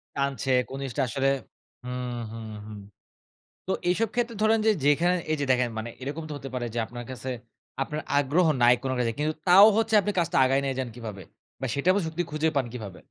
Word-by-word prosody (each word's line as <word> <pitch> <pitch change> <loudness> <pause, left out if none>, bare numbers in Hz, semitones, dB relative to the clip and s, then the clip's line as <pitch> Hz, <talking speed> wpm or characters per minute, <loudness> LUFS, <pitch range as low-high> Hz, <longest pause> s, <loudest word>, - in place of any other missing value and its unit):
টানছে 140 -2 -1 0.2
কোন 135 - -6
জিনিসটা 135 +1 -1
আসলে 135 +4 0 0.6
হুম, 125 -1 -4
হুম, 115 -1 -7 0.2
হুম। 105 -1 -8 0.9
তো - - 0 0.2
এইসব 220 +5 +2
ক্ষেত্রে 235 -1 -1
ধরেন 220 +1 +4
যে 220 - +6
যেইখানে 165 +5 +3 0.2
এই 155 - +1
যে 140 - +1
দেখেন 125 -1 +2
মানে 110 +2 -4
এরকম 145 +5 -4
তো - - -4
হতে 135 -1 -8
পারে 125 -1 -2
যে 120 - -1
আপনার 120 +1 -8
কাছে 130 +1 -6 0.5
আপনার 150 +2 -5 0.2
আগ্রহ 145 +6 +2 0.2
নাই 120 +1 +8
কোনটাতে। 125 -3 0
কিন্তু 155 +1 0
তাও 190 +3 +9
হচ্ছে 225 -1 +2
আপনি 205 - -1
কাজটা 170 -2 0
আগায় 135 +1 +2
নিয়ে 135 -1 -1
যান 130 - -2
কিভাবে? 110 -5 -7 0.4
বা 135 - -1
সেটাবও 185 +8 +3
যুক্তি 160 +2 -2
খুঁজে 155 +1 +1
পান 130 - +1
কিভাবে? 105 -6 -7
135 Hz, 195 wpm, -26 LUFS, 125-165 Hz, 0.9 s, তাও